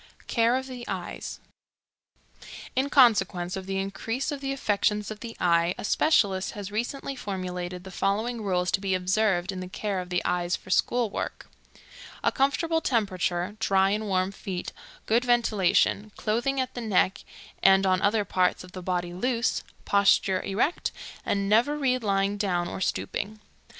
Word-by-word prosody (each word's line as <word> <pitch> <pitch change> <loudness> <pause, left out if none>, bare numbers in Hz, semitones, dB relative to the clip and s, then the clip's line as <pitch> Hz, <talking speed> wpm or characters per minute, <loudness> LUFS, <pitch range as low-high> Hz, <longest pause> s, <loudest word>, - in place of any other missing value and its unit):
Care 230 +1 +2
of 260 - -4
the 255 -2 -8
Eyes. - - -5 1.4
In 270 +2 +1
consequence 195 -10 +4
of 190 -1 -6
the 195 0 -2
increase 225 +8 -2
of 280 -1 -5
affections 210 -6 0
of 215 - -7
the 230 0 -8
eye, 170 0 +3
a - - -6
specialist 200 -7 +2
has 205 -1 -6
recently 245 +5 -3
formulated 180 -4 -5
the 190 - -9
following 220 +5 -1
rules 180 -3 0
to 195 - +1
be 195 -2 +1
observed 185 0 +1
in 190 - -6
the 185 - -5
care 195 +1 -3
of 180 0 -6
the 180 -1 -1
eyes 175 0 0
for 185 - -10
school 240 +2 +2
work: - - -5 0.8
A - - +3
comfortable 320 +4 +1
temperature, 190 - 0
dry 195 -3 +3
and 215 +1 -1
warm 185 -1 +1
feet, 190 -2 -5 0.3
good 230 +3 +2
ventilation; 215 -3 +2
clothing 240 +6 0
at 260 -1 -2
the 245 - -5
neck 195 -4 +2 0.4
and 195 0 +6
on 185 0 +2
other 210 0 +2
parts 185 -1 +1
of 180 - -13
the 185 - -7
body 175 -1 -2
loose; 235 +5 0 0.2
posture 195 -1 +3
erect, 230 - 0 0.3
and 200 -1 0
never 235 +8 +3
read 255 -4 +1
lying 200 0 +1
down 180 -4 0
or - - -6
stooping. 210 +2 -2
200 Hz, 160 wpm, -27 LUFS, 185-235 Hz, 1.4 s, and